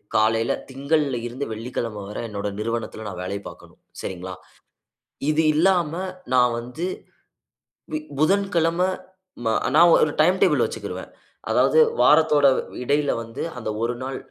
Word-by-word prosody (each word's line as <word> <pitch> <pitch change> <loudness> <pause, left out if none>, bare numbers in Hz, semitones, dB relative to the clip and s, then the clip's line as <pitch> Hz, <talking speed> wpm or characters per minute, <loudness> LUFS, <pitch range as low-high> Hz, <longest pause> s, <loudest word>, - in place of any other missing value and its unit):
காலையில 115 +1 +3 0.2
திங்கள்ல 140 0 0
இருந்து 130 +4 -5
வெள்ளிக்கிழமை 115 -1 -4
வர 105 - -7
என்னோட 105 -2 -4
நிறுவனத்தில 110 0 -3
நான் 90 - -7
வேலை 100 +2 -3
பாக்கணும். - - -14 0.2
சரிங்களா? 95 0 -6 1.0
இது 155 +1 +2
இல்லாம 170 -1 +3 0.4
நான் 125 -1 +4
வந்து 125 +8 -6 1.1
இ - - -4 0.2
புதன்கிழம 170 -1 +2 0.7
ம - - +1 0.3
நான் 170 +2 +7
ஒரு 150 - +1
டைம் 180 +4 +4
டேபிள் - - +4
வச்சிக்கிருவேன். - - -6 0.4
அதாவது - - +4 0.2
வாரத்தோட 150 -3 +5 0.4
இடையில 145 +2 +1
வந்து, 115 +2 -8 0.2
அந்த 110 -3 -4
ஒரு 120 +1 0
நாள், 135 +1 -4
130 Hz, 125 wpm, -23 LUFS, 115-155 Hz, 1.1 s, நான்